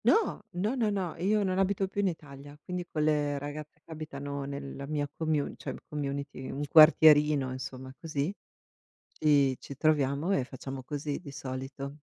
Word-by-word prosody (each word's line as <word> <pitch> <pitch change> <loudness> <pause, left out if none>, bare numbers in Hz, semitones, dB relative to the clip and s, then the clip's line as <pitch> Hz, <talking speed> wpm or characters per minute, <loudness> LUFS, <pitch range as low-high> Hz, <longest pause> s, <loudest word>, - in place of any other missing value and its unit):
No. 445 - +3
No, 200 +7 0
no, 230 -4 +2
no, 190 -5 -2
io 205 +5 +2
non 185 -1 0
abito 195 0 +1
più 200 +1 -2
in 200 - +2
Italia, 145 -4 -7
quindi 180 -1 -4
quelle 150 -2 +1
ragazze 150 +1 -7
che - - -14
abitano 140 -2 -5
nella 140 0 -6
mia 145 -1 -1
commu 155 0 -1
cioè - - -5
community, 140 -2 -4
un 145 - -3
quartierino 150 -3 +7
insomma 130 0 -6
così, 155 +2 -2 0.8
ci 140 -3 +3
ci 140 - -9
troviamo 145 +3 +2
e 130 - +1
facciamo 135 +1 -7
così 145 +1 -3
di 145 -5 -9
solito. 135 +1 -6
145 Hz, 160 wpm, -30 LUFS, 140-160 Hz, 0.8 s, quartierino